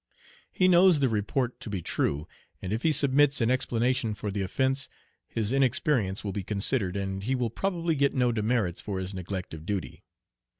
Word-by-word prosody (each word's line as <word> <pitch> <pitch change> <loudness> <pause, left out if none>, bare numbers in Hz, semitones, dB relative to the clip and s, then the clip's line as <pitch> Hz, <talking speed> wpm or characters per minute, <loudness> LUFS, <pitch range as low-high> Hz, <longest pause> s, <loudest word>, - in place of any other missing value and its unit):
He 185 - +2
knows 180 -2 +6
the 135 - +3
report 120 +4 -1
to - - -7
be 95 -5 -4
true, 75 +1 -1 0.3
and 95 +2 -4
if 115 - -2
he 160 - +3
submits 145 -1 +4
an 115 0 +2
explanation 125 -2 0
for 105 0 -4
the 100 0 -2
offence 135 +8 0 0.4
his 110 -1 -2
inexperience 130 -6 +1
will 100 - -3
be 100 - -2
considered, 100 0 0
and 95 -1 -3
he 125 +7 -1
will 120 -3 -1
probably 170 +2 -1
get 140 -2 +1
no 125 -2 +2
demerits 110 -5 0
for 100 -2 -4
his 95 +1 -4
neglect 95 -1 -5
of 80 -1 -8
duty. 90 -8 -4
115 Hz, 185 wpm, -28 LUFS, 100-135 Hz, 0.4 s, knows